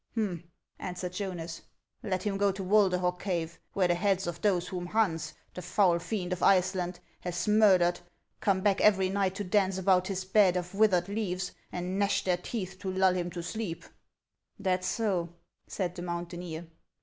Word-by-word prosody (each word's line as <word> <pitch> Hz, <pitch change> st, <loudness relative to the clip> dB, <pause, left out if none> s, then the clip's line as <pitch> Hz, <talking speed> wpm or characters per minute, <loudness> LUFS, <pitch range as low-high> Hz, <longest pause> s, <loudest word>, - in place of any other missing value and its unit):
" -, -, -39 dB
Hum! 185 Hz, -7 st, -2 dB, 0.2 s
" -, -, -59 dB
answered 180 Hz, 0 st, -5 dB
Jonas. 175 Hz, -4 st, -5 dB, 0.2 s
" -, -, -59 dB
Let 185 Hz, -2 st, -1 dB
him 205 Hz, -2 st, -1 dB
go 200 Hz, 0 st, +3 dB
to 195 Hz, 0 st, -6 dB
"\Vulderhog 180 Hz, -3 st, +3 dB
cave, 170 Hz, -4 st, -3 dB
where 185 Hz, -2 st, +2 dB
the 175 Hz, -, +3 dB
heads 195 Hz, +1 st, +1 dB
of 170 Hz, -1 st, -5 dB
those 180 Hz, -4 st, +2 dB
whom 180 Hz, -1 st, -4 dB
Hans, 170 Hz, -7 st, 0 dB, 0.2 s
the 180 Hz, -, -6 dB
foul 180 Hz, -1 st, +3 dB
fiend 185 Hz, -1 st, -3 dB
of 180 Hz, -, -5 dB
Iceland, 185 Hz, -2 st, +2 dB, 0.2 s
has 175 Hz, +3 st, -3 dB
murdered, 190 Hz, -5 st, +5 dB, 0.4 s
come 190 Hz, -2 st, +1 dB
back 200 Hz, 0 st, +2 dB
every 190 Hz, -3 st, +4 dB
night 195 Hz, -1 st, 0 dB
to 205 Hz, -, -3 dB
dance 190 Hz, 0 st, +1 dB
about 185 Hz, -1 st, +3 dB
his 190 Hz, -1 st, -3 dB
bed 190 Hz, -2 st, +4 dB
of 180 Hz, +1 st, -4 dB
withered 195 Hz, -4 st, +3 dB
leaves, 190 Hz, -3 st, -2 dB, 0.2 s
and 180 Hz, +2 st, -3 dB
gnash 200 Hz, 0 st, +2 dB
their 180 Hz, -2 st, +1 dB
teeth 190 Hz, -1 st, -5 dB
to 190 Hz, -2 st, -3 dB
lull 190 Hz, 0 st, +3 dB
him 175 Hz, -1 st, -2 dB
to 175 Hz, -1 st, -6 dB
sleep." 200 Hz, -2 st, -4 dB, 0.4 s
" -, -, -48 dB
That 185 Hz, -2 st, 0 dB
's -, -, -1 dB
so,'' 180 Hz, -7 st, -1 dB, 0.3 s
said 180 Hz, -3 st, -2 dB
the 180 Hz, -, -7 dB
mountaineer. 175 Hz, -1 st, -5 dB
185 Hz, 190 wpm, -30 LUFS, 175-195 Hz, 0.4 s, murdered